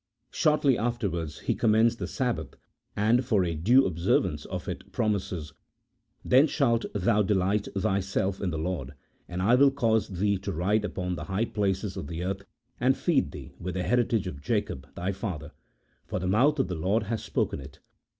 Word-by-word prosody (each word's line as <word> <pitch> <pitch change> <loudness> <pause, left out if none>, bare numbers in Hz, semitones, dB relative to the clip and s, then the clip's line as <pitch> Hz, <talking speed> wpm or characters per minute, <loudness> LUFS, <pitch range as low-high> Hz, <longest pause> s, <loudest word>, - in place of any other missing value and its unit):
Shortly 150 -5 +3
after 120 -1 0
wards 80 -3 -5
he - - 0
commends 115 +1 +3
the - - -4
Sabbath, 125 -4 -2 0.4
and 115 +5 +3
for 105 -7 +2
a 85 - -1
due 120 - +4
observance 85 0 0
of - - -5
it, - - -6
promises: 95 -8 -2 0.4
" - - -37
Then 135 +5 +6
shalt 120 -6 +1
thou 105 +2 +3
delight 100 0 +1
thyself 95 0 0
in 95 - 0
the 80 - -3
Lord, 80 -4 -3 0.3
and 90 +1 -3
I 110 +5 +4
will 140 +2 +7
cause 115 -6 +1
thee 100 +1 0
to 100 +1 -4
ride 100 +5 +1
upon 90 -3 -3
the - - -5
high 100 +4 0
places 100 -2 -1
of - - -5
the 85 +3 -4
earth, 95 +2 -2 0.4
and - - +3
feed - - +1
thee - - -9
with 90 +1 -4
the 90 - -1
heritage 120 -3 +1
of 70 -7 -6
Jacob 70 -1 -2
thy 90 +3 -2
father: 90 -7 -5 0.6
for - - -3
the 90 - -3
mouth 125 +11 +3
of 135 - +1
the 90 - -3
Lord 95 +7 +1
has 110 +1 -3
spoken - - -1
it." 65 - -11
100 Hz, 190 wpm, -28 LUFS, 90-115 Hz, 0.6 s, will